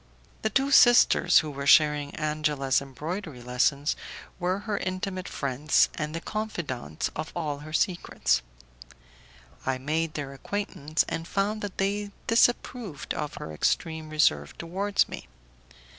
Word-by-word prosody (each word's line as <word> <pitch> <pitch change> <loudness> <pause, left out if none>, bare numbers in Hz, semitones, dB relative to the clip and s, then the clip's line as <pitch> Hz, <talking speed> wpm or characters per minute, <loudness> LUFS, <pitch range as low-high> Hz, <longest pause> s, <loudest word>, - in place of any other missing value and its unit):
The 220 - +1
two 270 +6 +1
sisters 240 -3 +6
who 150 - -4
were 140 0 -5
sharing 150 -2 +5
Angela's 150 -3 0
embroidery 150 - -6
lessons 135 +4 +1 0.4
were 185 +2 0
her 210 -2 -2
intimate 185 0 -3
friends 140 +2 +2
and 155 0 -4
the - - -2
confidantes 165 - -4
of 155 +1 -4
all 150 -4 -2
her 155 +2 -10
secrets. 175 +2 +1 1.2
I 130 0 0
made 155 +4 -1
their 140 -2 -4
acquaintance, 155 -1 -2
and 165 0 -4
found 205 +3 -1
that 205 -2 -5
they 200 +1 -1 0.2
disapproved 230 - +1
of 150 -1 -4
her 80 - -7
extreme 160 - -1
reserve 75 - +2
towards 195 +4 0
me. - - -8
155 Hz, 130 wpm, -27 LUFS, 145-195 Hz, 1.2 s, sisters